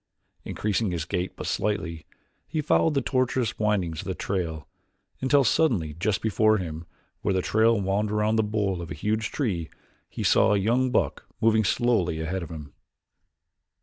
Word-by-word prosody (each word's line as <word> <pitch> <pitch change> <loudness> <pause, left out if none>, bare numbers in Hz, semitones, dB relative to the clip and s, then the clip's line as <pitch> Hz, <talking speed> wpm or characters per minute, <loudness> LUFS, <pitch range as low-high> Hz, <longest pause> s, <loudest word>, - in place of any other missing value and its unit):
Increasing 105 0 -1
his 85 -3 -3
gait 90 +2 -3
but - - -7
slightly 90 -7 -2 0.4
he 160 - -3
followed 150 +1 +2
the 135 - +1
tortuous 130 -2 0
windings 95 -7 0
of - - -10
the - - -2
trail 80 -7 -3 0.5
until 140 +1 +4
suddenly 115 - +2
just 95 +5 -1
before 110 0 +3
him, 85 -3 -6 0.3
where 100 -2 0
the 95 - +1
trail 110 0 +3
wound 100 +2 0
about 105 +1 +1
the 110 - +4
bole 105 -4 -1
of 85 - -7
a - - -5
huge 105 +7 -1
tree, 95 - -2 0.4
he - - -5
saw 105 - +4
a - - +3
young 120 +6 +2
buck - - -1
moving 110 -1 +3
slowly 100 -7 +1
ahead 90 +4 -2
of 85 - -7
him. 75 -4 -9
105 Hz, 170 wpm, -26 LUFS, 85-110 Hz, 0.5 s, until